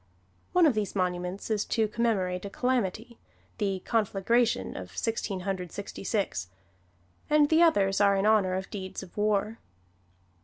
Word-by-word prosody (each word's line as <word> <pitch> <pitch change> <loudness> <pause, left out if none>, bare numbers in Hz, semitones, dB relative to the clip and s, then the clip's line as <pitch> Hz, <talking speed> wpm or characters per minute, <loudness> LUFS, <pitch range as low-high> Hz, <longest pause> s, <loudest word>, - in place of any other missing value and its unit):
One 360 -1 +5
of 295 - +5
these 210 -2 -2
monuments 180 +2 -2
is 210 -1 +1
to 220 -1 +1
commemorate 205 -5 0
a 200 - -5
calamity 235 0 -2 0.4
the 195 -3 -1
conflagration 220 - +1
of 90 -1 -8
Sixteen 215 -4 -2
Hundred 180 -2 -3
Sixty 200 -1 -7
six 195 - -1 0.8
and 300 -1 +4
the 320 +1 +4
others 200 - +3
are 200 -1 +5
in 195 +1 +1
honor 205 -4 +3
of 190 +1 -5
deeds 190 -2 -6
of 175 - -14
war. 210 +1 0
200 Hz, 150 wpm, -28 LUFS, 190-225 Hz, 0.8 s, One